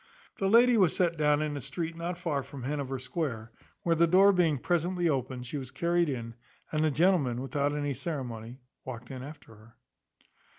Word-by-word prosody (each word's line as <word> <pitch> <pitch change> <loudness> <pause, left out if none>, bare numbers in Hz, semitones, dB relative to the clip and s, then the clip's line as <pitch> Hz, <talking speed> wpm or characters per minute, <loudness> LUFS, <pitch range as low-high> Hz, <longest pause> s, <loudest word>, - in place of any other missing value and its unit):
The 195 - +1
lady 240 +2 +6
was 185 -6 +4
set 175 -2 +2
down 150 -1 +2
in 150 -1 -2
a 140 - -4
street 160 +5 -4
not 170 +1 -4
far 165 -6 -1
from 135 -1 -9
Hanover 135 -1 -2
square, 125 -4 -4 0.3
where 170 - +2
the 170 +1 +4
door 195 +4 +6
being 165 -5 +2
presently 175 +3 0
opened, 130 -4 -2
she 140 +4 -4
was 130 -2 -7
carried 170 +2 +1
in, 115 -4 -4 0.4
and 155 0 +1
the 155 - +3
gentleman, 150 -6 +2
without 145 +2 -1
any 145 -1 -1
ceremony, 125 -6 -5 0.3
walked 125 -1 -8
in 130 -1 -6
after 145 -4 -11
her. 110 +2 -18
150 Hz, 185 wpm, -29 LUFS, 130-170 Hz, 0.4 s, lady